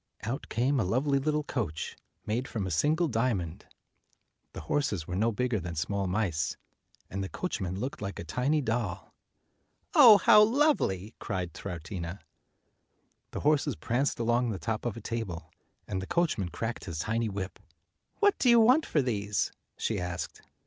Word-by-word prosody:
Out 120 +6 -4
came 130 +4 +1
a - - +2
lovely 135 +9 +1
little 150 +2 0
coach 100 - -3 0.3
made 120 +5 -1
from 105 -4 -3
a 95 - -3
single 155 - +2
dia 120 -2 +1
mond; 85 -4 -6 0.9
the - - -6
horses 105 - -1
were 90 - -4
no 110 +5 +2
bigger 125 0 0
than 85 -1 -5
small 100 +4 -1
mice, 90 -4 -1 0.5
and 95 0 -3
the 95 - -4
coachman 95 - -3
looked 130 +1 -4
like 100 -1 -4
a - - -5
tiny 125 - 0
doll. 115 -6 -2 0.8
"Oh, 250 - +10
how 210 +2 +7
lovely!" 215 - +2
cried 90 -5 -3
Troutina. 85 0 -6 1.1
The - - -5
horses 145 -2 +2
pranced 130 +2 -1
along 120 +1 +2
the 105 - -2
top 110 +5 -2
of 115 - -4
a - - -7
table, 95 -8 -5 0.4
and 95 - -2
the 95 - -6
coachman 155 - 0
cracked 115 +6 -4
his 85 -5 -5
tiny 110 +6 -1
whip. 100 -1 -5 0.6
"What 410 -1 +3
do 250 - +4
you 235 -1 +7
want 255 +8 +5
for 150 - +2
these?" 105 -4 -1 0.3
she - - -1
asked. 90 -1 -4
115 Hz, 165 wpm, -29 LUFS, 95-140 Hz, 1.1 s, Oh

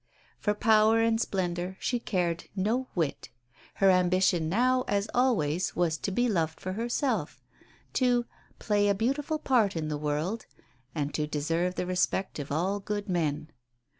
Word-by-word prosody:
For 210 -1 0
power 220 +1 +4
and 225 0 +2
splendour 180 -1 -2
she 245 - -1
cared 175 -7 -1
no 225 +7 0
whit. 160 -6 -2 0.5
Her 195 -1 +5
ambition 180 -2 +2
now, 255 +6 +2
as 200 +1 0
always, 190 - +1
was 170 -2 +1
to - - -2
be 245 +6 +1
loved 165 -7 -1
for 185 - -4
herself, 240 +5 -1 0.5
to 245 -2 +2 0.3
"play 205 -1 +1
a 200 - +3
beautiful 275 +8 -1
part 245 -10 +2
in 155 -1 -2
the 150 -1 -3
world," 155 +9 -2 0.5
and 145 -2 -2
to 150 -1 -1
deserve 165 +5 -1
the - - -2
respect 185 0 -1
of 140 -1 -6
all 185 +7 0
good 205 0 -4
men. 155 -3 -1
190 Hz, 155 wpm, -28 LUFS, 165-225 Hz, 0.5 s, Her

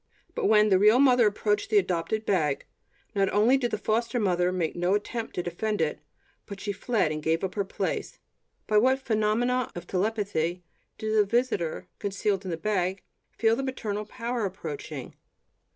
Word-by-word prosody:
But 485 -3 0
when 215 -1 +5
the 190 -2 +5
real 210 +4 +6
mother 250 -4 +5
approached 210 0 0
the 215 - +4
adopted 185 +3 0
bag, 155 -8 +1 0.5
not 195 -1 +2
only 220 +6 +4
did 255 -3 0
the 215 - -2
foster 230 +3 0
mother 180 -3 +2
make 175 -3 -1
no 175 +3 +1
attempt 225 +2 -4
to 180 - -1
defend 210 +5 -2
it, 155 -2 0 0.5
but 200 -1 -8
she 205 - -3
fled 200 -4 0
and 155 0 -3
gave 160 +3 0
up 190 - -2
her 200 - 0
place. 190 - -3 0.5
By 210 -1 +4
what 260 +4 +4
phenomenon 235 +1 0
of 175 0 -6
telepathy 185 -3 -1 0.3
did 215 0 -2
the 210 - +6
visitor 200 -6 -1
concealed 200 0 -1
in - - -4
the 165 - -2
bag 190 0 -1 0.3
feel 225 0 +3
the 265 - -2
maternal 215 -6 -3
power 235 +1 -3
approaching? 415 - -6
210 Hz, 175 wpm, -27 LUFS, 185-230 Hz, 0.5 s, real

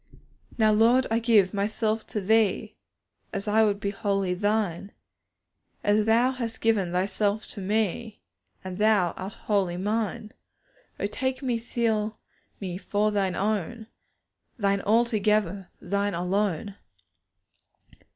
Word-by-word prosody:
Now, 220 -2 +4
Lord, 235 +5 +4
I 225 - +3
give 220 -5 +3
myself 215 +2 -1
to 210 - -3
Thee, 215 0 +1 0.7
I 220 +1 +4
would 205 -2 +1
be 200 0 -2
wholly 195 -2 -1
Thine, 205 -1 -1 0.9
As 210 +1 +2
Thou 235 +3 +4
hast 235 -3 -4
given 210 -6 +1
Thyself 200 +3 0
to 200 - -7
me, 215 +2 -1 0.4
And 185 0 -6
Thou 210 -5 +3
art 190 +2 -7
wholly 195 -5 +1
mine; 215 +1 -2 0.7
O - - -1
take 260 +6 -2
me, 245 -3 0
seal 220 -2 -1 0.4
me 185 -2 -5
for 205 +2 0
Thine 195 -3 0
own, 215 +2 -2 0.7
Thine 200 -3 +1
altogether, 210 -4 +1
Thine 200 +1 -1
alone. 195 +2 -1
210 Hz, 120 wpm, -26 LUFS, 195-220 Hz, 0.9 s, Now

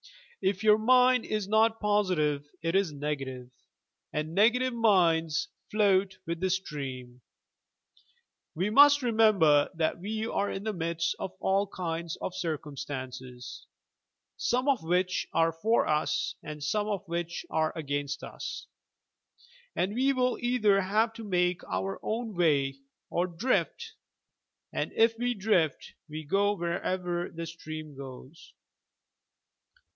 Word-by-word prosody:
If 190 +1 0
your 215 0 +6
mind 250 +1 +4
is 215 -2 -2
not 220 +2 +3
positive 180 -9 +1
it 165 0 0
is 195 -4 +2
negative, 135 -4 -4 0.6
and 155 +1 -3
negative 240 +6 +3
minds 170 -9 +2 0.2
float 195 -2 +2
with 170 0 -3
the 190 +1 0
stream. 135 -9 -4 1.3
We 185 +6 0
must 285 +3 +7
remember 210 -11 +4
that 160 +1 0
we 215 +4 -3
are 205 -2 -1
in 195 - -4
the 220 0 -2
midst 165 -1 -1
of 185 - -4
all 195 +1 +1
kinds 170 -3 -4
of 185 - -4
circumstances, 130 -6 -6 0.7
some 250 +3 0
of 275 -4 +3
which 180 +3 0
are 165 0 +3
for 215 +9 +1
us 150 0 0
and 150 -1 -7
some 205 +8 0
of 205 -5 -3
which 170 0 -3
are 160 0 +1
against 145 0 -3
ua, - - -9 1.4
and 190 +3 0
we 265 +4 +2
will 255 -1 +1
either 215 -5 +3
have 215 +4 +1
to 225 - -9
make 180 -3 0
our 95 +1 -2
own 225 0 -3
way, 140 -6 +2 0.3
or 175 +1 +1
drift, 255 - -1 0.8
and - - -2
if 225 0 +4
we 245 0 0
drift 190 -8 0 0.2
we 155 +1 -6
go 200 +6 +2
wherever 175 0 -2
the 165 0 -6
stream 155 -2 -8
goes. 135 +3 -11
180 Hz, 130 wpm, -29 LUFS, 155-215 Hz, 1.4 s, must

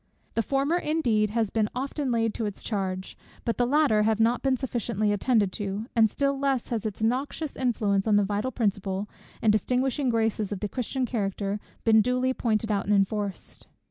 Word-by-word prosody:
The 230 - +1
former 275 +7 +1
indeed 245 -11 +1
has 220 -1 0
been 215 -2 +1
often 270 +1 -2
laid 225 -2 +1
to 225 - -2
its 205 - -7
charge, 190 -3 -3 0.3
but 230 - -1
the 245 - +3
latter 280 -6 +3
have 220 0 +2
not 230 +2 +3
been 265 -1 +2
sufficiently 230 -5 -1
attended 205 -2 +2
to; 205 +1 -4
and 225 -2 +5
still 275 +4 0
less 270 -3 0
has 225 -3 -1
its 215 +1 -5
noxious 270 +6 -1
influence 215 -5 0
on 210 - +4
the 205 - +4
vital 205 +5 -1
principle, 200 -3 -1 0.4
and 220 - +5
distinguishing 255 +5 +1
graces 220 -3 0
of 200 - -3
the 210 - -2
Christian 255 +2 -2
character, 205 -3 -2 0.2
been 220 -1 +6
duly 250 +3 +1
pointed 220 -3 0
out 200 -1 0
and 205 - +4
enforced. 200 0 -2
225 Hz, 185 wpm, -27 LUFS, 205-255 Hz, 0.4 s, been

